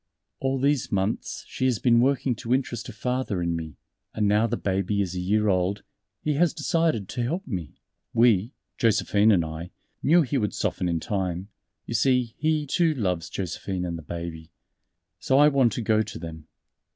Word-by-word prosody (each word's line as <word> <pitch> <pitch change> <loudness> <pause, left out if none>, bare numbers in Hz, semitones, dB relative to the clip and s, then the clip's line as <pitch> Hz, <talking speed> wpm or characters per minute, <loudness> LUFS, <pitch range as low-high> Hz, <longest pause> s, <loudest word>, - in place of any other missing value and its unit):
"All 135 0 0
these 140 -2 +1
months 100 +2 -2
she 130 - -2
has 125 -3 +2
been 120 0 +4
working 135 0 +2
to 120 +1 +1
interest 125 -3 -3
her - - -6
father 125 -2 -2
in 85 -1 0
me, 80 -2 -6 0.4
and 105 -1 +1
now 105 +3 +3
the 120 +1 -2
baby 100 +1 -1
is 95 -3 -1
a 90 - -3
year 105 +4 +1
old, 95 +1 +1 0.4
he 150 - +1
has 165 +3 +2
decided 165 - +1
to 120 - -3
help 165 +11 -2
me.... 90 - -5 0.4
We 115 0 +3 0.2
Josephine 105 -1 +3
and 90 -5 +3
I 80 +2 -6 0.3
knew 170 +3 +5
he 135 0 -1
would 105 -2 -1
soften 90 - -1
in 85 -1 0
time; 95 0 -3 0.4
you - - -5
see 125 -1 +2
he, 155 0 +1
too, 160 +2 +2
loves 90 - -1
Josephine 95 0 -3
and 85 -1 -3
the 80 - -6
Baby. 80 0 -7 0.7
So 130 - +2
I 145 +1 +7
want 135 -5 +3
to 120 - -3
go 110 0 +3
to 105 -3 -5
them." 80 -2 -8
110 Hz, 190 wpm, -26 LUFS, 90-130 Hz, 0.7 s, I